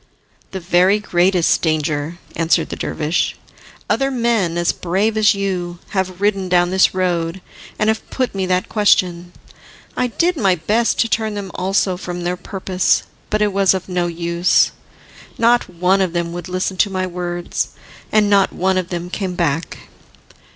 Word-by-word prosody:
"The 190 - -5
very 180 +3 +3
greatest 180 -3 +2
danger," 155 0 -1 0.2
answered 165 0 +1
the - - -4
dervish. 155 +2 -1 0.5
"Other 270 0 +1
men, 230 -9 0
as 170 0 +2
brave 195 +5 -1
as 215 -1 +4
you, 180 -3 -3
have 190 -2 -2
ridden 195 -2 0
down 175 0 +3
this 190 0 +3
road, 175 -1 -1 0.4
and 210 - +1
have 220 0 -1
put 255 -2 -2
me 190 -1 -2
that 185 0 0
question. 180 -4 +2 0.6
I 250 - +1
did 340 +8 0
my 195 -7 +3
best 220 +7 +1
to - - +1
turn 220 -2 -1
them 200 -2 -5
also 190 0 0
from 175 -1 -6
their 175 +1 -1
purpose, 185 0 0 0.3
but 215 0 +1
it 205 -2 0
was 195 -1 +3
of 185 - -5
no 180 -1 -1
use. 170 +1 +2 0.7
Not 235 -1 +3
one 180 +2 +1
of 185 -3 0
them 170 -1 -2
would 175 0 -6
listen 185 +1 -2
to 200 - +3
my 185 -1 -2
words, 175 -1 -3 0.4
and 215 -1 +4
not 200 -1 +3
one 190 +1 +1
of 180 -1 -5
them 175 0 -5
came 190 -3 -3
back. 165 -2 -1
185 Hz, 165 wpm, -19 LUFS, 175-200 Hz, 0.7 s, as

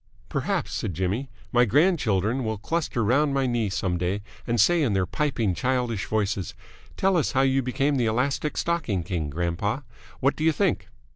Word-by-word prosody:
"Perhaps," - - -1
said 90 - -3
Jimmy, 100 - -1 0.2
"my 120 -1 +5
grandchildren 125 - +2
will 110 -1 -2
cluster 145 +1 -1
round 140 +6 +2
my 135 -1 +2
knee 120 -4 0
some 90 -2 -1
day 95 +3 -1 0.2
and 120 -1 0
say 170 - +5
in 125 -8 +1
their 95 -1 +2
piping, 115 -1 0
childish 125 -1 -1
voices, 105 -3 -1 0.4
'Tell 190 0 +2
us 155 - 0
how 135 - +3
you 135 0 +3
became 135 +3 0
the 120 -3 +1
Elastic 135 +6 0
Stocking 145 - 0
King, 85 -5 -3
grandpa!' 85 - -1 0.4
What 140 +2 +2
do 155 - -4
you 160 - +5
think?" 150 - 0
120 Hz, 175 wpm, -25 LUFS, 100-140 Hz, 0.4 s, my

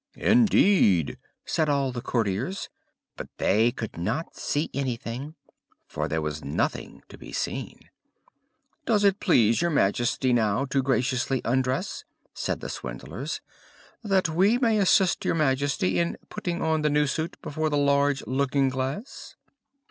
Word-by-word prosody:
"Indeed!" 195 - +3 0.3
said 155 -2 0
all 140 -2 +1
the 120 -1 -5
courtiers; 120 - -2 0.5
but - - -7
they 110 +4 +3
could 110 -7 -6
not 115 - -3
see 145 +2 -2
anything, 130 +2 -4 0.5
for - - -3
there 80 -1 -2
was 75 0 -4
nothing 70 - -3
to - - -13
be - - -11
seen. - - -4 1.1
"Does 210 -3 +3
it 200 -1 +3
please 115 - +3
your 170 - +2
Majesty 125 -1 +1
now 110 +2 +1
to 135 0 0
graciously 130 0 0
undress," 130 - -1 0.3
said - - -3
the - - -5
swindlers, - - -6 0.6
"that 195 -4 +2
we 190 +8 +3
may 230 -4 +2
assist 190 -1 +3
your - - +1
Majesty 135 - +1
in 85 0 -1
putting 175 -1 -3
on 160 -1 +1
the 150 - +2
new 150 0 +2
suit 160 +5 -3
before 155 +1 -2
the 145 - 0
large 140 -1 +2
looking 135 +2 +1
glass?" 130 - -5
140 Hz, 140 wpm, -26 LUFS, 120-160 Hz, 1.1 s, Indeed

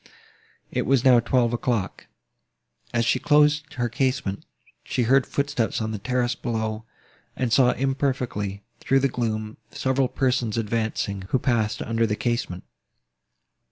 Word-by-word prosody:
It - - -1
was 135 -1 +3
now 125 -2 +7
twelve 120 0 +1
o'clock. 120 -5 -2 0.8
As 120 -1 +1
she 130 - +2
closed 150 0 +3
her 120 -2 0
casement, 120 -5 -1 0.4
she 125 - -1
heard 130 +3 +3
footsteps 140 -5 -1
on 110 -1 -2
the 105 - -4
terrace 125 +2 0
below, 110 -2 -3 0.5
and 125 -3 -1
saw 125 -1 +5
imperfectly, 130 -7 -2 0.2
through 135 0 +2
the 140 - +3
gloom, 110 -3 -3
several 130 +2 0
persons 125 -4 0
advancing, 110 -3 -2
who - - +2
passed 115 -4 0
under 115 0 0
the 105 - 0
casement. 115 -7 -2
120 Hz, 135 wpm, -24 LUFS, 110-130 Hz, 0.8 s, now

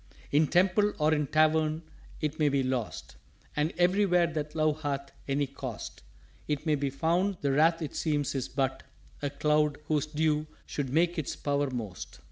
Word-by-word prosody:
_" - - -29 0.3
"In 150 +2 +4
Temple 190 +5 +3
or 155 0 +3
in 150 -2 +1
Tavern 155 +1 +2 0.4
't 150 0 -2
may 150 -1 +4
be 140 -1 +1
lost. 120 - -3 0.4
And 150 +2 +1
everywhere 180 0 +4
that 155 -2 -4
Love 155 -1 +1
hath 140 -2 -3 0.2
any 140 +1 +1
Cost 130 -4 -7 0.5
It 150 +1 -2
may 155 - +2
be 140 -1 0
found; 175 +7 +1
the 140 - +1
Wrath 160 +4 +3
it 150 - -5
seems 150 -3 0
is 135 -3 -2
but 135 -1 -1 0.4
A 145 - -1
Cloud 150 +1 +1
whose 150 -2 0
Dew 155 0 0 0.2
should 140 -3 -3
make 170 +4 +2
its 150 - -3
power 145 -1 0
most." 110 - -6
150 Hz, 175 wpm, -29 LUFS, 140-160 Hz, 0.5 s, In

